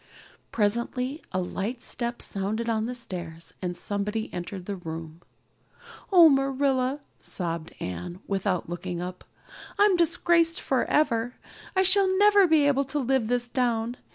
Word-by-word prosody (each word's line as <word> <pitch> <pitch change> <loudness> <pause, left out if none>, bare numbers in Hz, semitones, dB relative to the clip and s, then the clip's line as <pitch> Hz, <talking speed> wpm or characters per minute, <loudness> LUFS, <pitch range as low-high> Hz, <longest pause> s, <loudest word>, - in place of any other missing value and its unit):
Presently 235 +7 0
a 185 - -1
light 195 +6 -3
step 240 -1 -4
sounded 210 +4 -2
on 225 -1 0
the 250 - -4
stairs 175 -8 -7
and 180 -2 -3
somebody 205 +3 -3
entered 180 +1 -6
the 200 - -3
room. 165 -2 -8 0.9
"Oh, 345 -4 +9
Marilla," 270 -1 +1 0.2
sobbed 170 -2 -4
Anne, 90 - -5
without 195 -2 -1
looking 175 +1 -5
up, 180 +1 -6 0.5
"I'm 410 -2 +5
disgraced 335 -1 +3
forever. 250 -3 +1 0.4
I 380 - +4
shall 385 +1 +5
never 410 -1 +6
be 310 -3 +4
able 280 -1 +2
to 270 +3 -4
live 265 -4 +1
this 245 0 0
down. 240 -2 0
235 Hz, 135 wpm, -26 LUFS, 185-280 Hz, 0.9 s, Oh